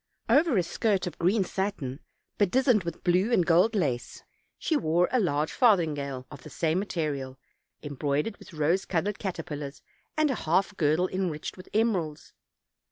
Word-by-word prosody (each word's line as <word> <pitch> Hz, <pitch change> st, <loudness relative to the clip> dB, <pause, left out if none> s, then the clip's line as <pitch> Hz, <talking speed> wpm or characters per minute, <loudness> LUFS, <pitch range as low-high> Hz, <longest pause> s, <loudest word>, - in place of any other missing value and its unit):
Over 280 Hz, +1 st, +4 dB
a 180 Hz, -, +3 dB
skirt 200 Hz, +1 st, 0 dB
of 180 Hz, -, -6 dB
green 190 Hz, +4 st, +3 dB
satin, 180 Hz, -9 st, -3 dB, 0.4 s
bedizened 215 Hz, 0 st, +3 dB
with 170 Hz, -1 st, -6 dB
blue 185 Hz, +6 st, +2 dB
and 180 Hz, -8 st, +3 dB
gold 180 Hz, +7 st, +4 dB
lace, 135 Hz, -11 st, -2 dB, 0.3 s
she 320 Hz, -, 0 dB
wore 175 Hz, -, +2 dB
a 255 Hz, -, +3 dB
large 155 Hz, -6 st, 0 dB
farthingale 150 Hz, -, +2 dB
of 145 Hz, -4 st, -10 dB
the -, -, -11 dB
same 160 Hz, +4 st, 0 dB
material, 145 Hz, -9 st, -3 dB, 0.5 s
embroidered 145 Hz, -, -2 dB
with -, -, -14 dB
rose 165 Hz, +4 st, +1 dB
colored 190 Hz, +4 st, -1 dB
caterpillars 150 Hz, -7 st, -5 dB, 0.3 s
and 310 Hz, -2 st, +3 dB
a 215 Hz, -10 st, -4 dB
half 195 Hz, +4 st, +2 dB
girdle 160 Hz, +2 st, +2 dB
enriched 180 Hz, -5 st, -3 dB
with 185 Hz, -, -13 dB
emeralds. 190 Hz, -9 st, -1 dB
175 Hz, 155 wpm, -28 LUFS, 150-205 Hz, 0.5 s, Over